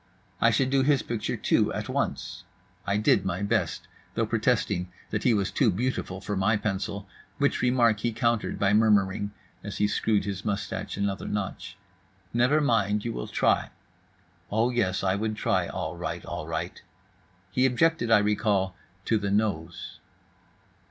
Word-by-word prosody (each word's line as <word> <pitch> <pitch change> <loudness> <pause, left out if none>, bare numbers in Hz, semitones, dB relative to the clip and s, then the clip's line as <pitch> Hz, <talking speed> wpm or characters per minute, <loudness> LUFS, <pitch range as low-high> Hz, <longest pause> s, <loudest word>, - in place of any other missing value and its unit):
I - - +6
should 135 -1 +1
do 135 0 +4
his 140 +1 +3
picture, 115 -3 -3
too, - - +2
at - - -4
once. - - -3 0.4
I 100 +1 +2
did 105 -2 +3
my 95 +1 -2
best; 100 -5 -1 0.3
though - - +1
protesting 90 +1 0 0.2
that 105 - -1
he 125 - +3
was 100 -3 +1
too 130 - +3
beautiful 100 -2 -2
for 105 - -3
my 100 +3 +2
pencil, 100 -1 -3 0.3
which 140 0 +1
remark 120 -4 +3
he 120 - 0
countered 115 0 0
by 100 0 +2
murmuring 100 -2 +3 0.3
(as - - -6
he 105 - +3
screwed 105 0 +1
his 100 -1 -4
moustache 100 -2 -3
another 100 -1 -2
notch), 100 -2 -4 0.6
"Never 125 +6 +3
mind, 105 -6 +1
you 115 - -2
will - - -5
try." - - +1 0.8
Oh, 115 +4 +2
yes, 95 -7 0
I 95 -1 +2
would 110 +2 -1
try - - +1
all - - -4
right, - - -5
all - - -5
right. - - -4 0.7
He 130 +4 +3
objected, 145 0 +2
I 115 - +7
recall, 105 -2 +1 0.3
to 110 - +2
the 100 -1 -2
nose. 100 -6 -2
105 Hz, 160 wpm, -27 LUFS, 100-120 Hz, 0.8 s, I